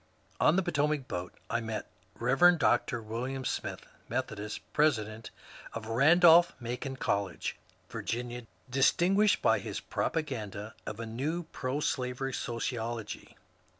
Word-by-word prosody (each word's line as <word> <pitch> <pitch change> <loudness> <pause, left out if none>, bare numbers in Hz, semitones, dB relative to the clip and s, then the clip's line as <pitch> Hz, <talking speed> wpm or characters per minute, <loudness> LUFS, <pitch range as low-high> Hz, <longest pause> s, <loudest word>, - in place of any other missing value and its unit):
On 155 - +5
the 190 - +3
Potomac 150 -4 0
boat 90 0 -5
I 115 - -1
met 110 -1 -4 0.3
Rev. 135 +9 +5
Dr. 120 -5 +2
William 125 +4 -4
Smith - - -3 0.2
(Methodist), 110 -4 -3
president 115 -7 +1 0.4
of 115 - -5
Bandolph 165 +9 +6
Macon 125 +3 -4
College, 100 -7 -2 0.3
Vir - - -6
ginia, 120 0 -4 0.2
distinguished 175 - +3
by - - +4
his - - -4
propaganda 110 -9 -3
of 110 - -5
a 115 - -3
new 140 +10 -2
proslavery 130 -1 -2
sociology. 115 -2 -4
125 Hz, 115 wpm, -31 LUFS, 115-150 Hz, 0.4 s, Bandolph